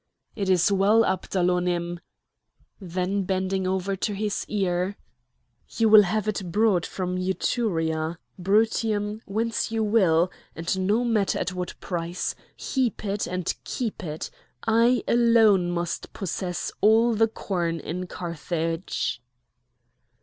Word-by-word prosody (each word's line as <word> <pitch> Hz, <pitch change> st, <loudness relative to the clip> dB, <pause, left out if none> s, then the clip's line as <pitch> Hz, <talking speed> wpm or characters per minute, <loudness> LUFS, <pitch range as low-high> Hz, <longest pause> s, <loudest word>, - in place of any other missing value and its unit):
"It 195 Hz, -2 st, -2 dB
is 185 Hz, +1 st, +4 dB
well, 200 Hz, +3 st, +4 dB
Abdalonim!" 180 Hz, -2 st, 0 dB, 0.8 s
Then 185 Hz, +1 st, -2 dB
bending 190 Hz, 0 st, -1 dB
over 190 Hz, +1 st, -1 dB
to 205 Hz, +2 st, -2 dB
his 210 Hz, 0 st, -2 dB
ear: 190 Hz, -1 st, -1 dB, 0.7 s
"You 225 Hz, -1 st, +2 dB
will 215 Hz, 0 st, +10 dB
have 210 Hz, +2 st, -1 dB
it 195 Hz, -4 st, -2 dB
brought 205 Hz, -3 st, +2 dB
from 185 Hz, -1 st, -3 dB
Etruria, 170 Hz, -4 st, -1 dB, 0.2 s
Brutium, 210 Hz, +2 st, +1 dB
whence 225 Hz, +3 st, -1 dB
you 225 Hz, -1 st, 0 dB
will, 185 Hz, -5 st, +3 dB, 0.2 s
and 185 Hz, +3 st, -1 dB
no 220 Hz, +4 st, +2 dB
matter 215 Hz, -4 st, +1 dB
at 185 Hz, -, -2 dB
what 180 Hz, -1 st, -5 dB
price! 175 Hz, 0 st, -3 dB, 0.2 s
Heap 255 Hz, -5 st, -1 dB
it 200 Hz, +1 st, -1 dB
and 180 Hz, -1 st, -2 dB
keep 225 Hz, -5 st, -4 dB
it! 155 Hz, -2 st, -5 dB, 0.3 s
I 230 Hz, +2 st, +3 dB
alone 225 Hz, -6 st, +4 dB
must 175 Hz, -1 st, -3 dB
possess 180 Hz, -2 st, -3 dB
all 225 Hz, +3 st, +5 dB
the 225 Hz, +1 st, +3 dB
corn 175 Hz, -6 st, -2 dB
in 180 Hz, +3 st, -5 dB
Carthage." 165 Hz, -4 st, -3 dB
190 Hz, 120 wpm, -25 LUFS, 175-215 Hz, 0.8 s, will